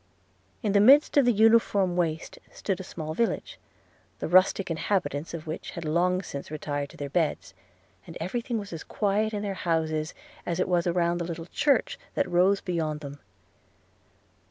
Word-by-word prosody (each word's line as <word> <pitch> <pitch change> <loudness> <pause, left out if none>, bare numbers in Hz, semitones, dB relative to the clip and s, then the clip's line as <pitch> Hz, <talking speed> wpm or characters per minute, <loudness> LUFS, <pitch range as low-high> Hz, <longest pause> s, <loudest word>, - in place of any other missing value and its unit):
In 210 - +1
the 200 - +4
midst 275 +8 +6
of 285 -3 +5
the 245 - +5
uniform 215 -4 +4
waste 165 -2 -2
stood 195 -2 -3
a - - -5
small 155 -3 -6
village, 230 +6 -2 0.6
the - - -4
rustic 185 +1 +4
inhabitants 165 -3 -1
of 155 - -8
which 155 +1 -5
had 170 - -5
long 180 +4 +1
since 140 -4 -7
retired 145 -2 -3
to - - -15
their 145 - -4
beds; 155 - -1 0.5
and 165 - -8
every 185 +9 -2
thing 235 0 -3
was 200 -4 -6
as 160 - -6
quiet 210 +1 0
in 205 -1 -3
their 200 -1 -2
houses 160 -3 -1 0.3
as 170 0 -3
it 185 - +1
was 175 -1 +1
around 175 0 +1
the 170 - -2
little 165 -1 -5
church 275 - +1 0.2
that - - +1
rose 185 +3 +3
beyond 155 -4 -2
them. 140 -1 -8
175 Hz, 180 wpm, -27 LUFS, 160-200 Hz, 0.6 s, midst